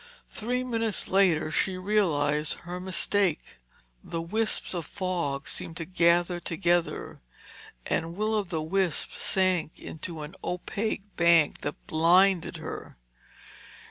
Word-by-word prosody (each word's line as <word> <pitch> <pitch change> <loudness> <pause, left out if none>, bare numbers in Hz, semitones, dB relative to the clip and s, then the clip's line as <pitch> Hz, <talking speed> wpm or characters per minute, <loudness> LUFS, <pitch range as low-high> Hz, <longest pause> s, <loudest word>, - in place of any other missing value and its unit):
Three 250 +3 -2
minutes 230 -4 -1
later, 175 -5 +3
she 185 +3 0
realized 155 -7 +2
her 175 +1 -5
mistake. 185 -1 0 0.5
The 165 - -4
wisps 215 +7 0
of 170 -4 -4
fog 175 -8 -2
seemed 165 - -3
to 165 - -4
gather 175 0 +3
together, 175 0 -1 0.6
and 165 +1 -2
Will 215 +2 0
o' 215 - +3
the 170 -4 -3
Wisp 180 0 0
sank 185 -4 0
into 160 -1 -7
an 150 +4 -8
opaque 200 +4 -2
bank 170 -3 +4
that 145 - -4
blinded 175 +3 +3
her. - - -8
175 Hz, 120 wpm, -28 LUFS, 165-195 Hz, 0.6 s, bank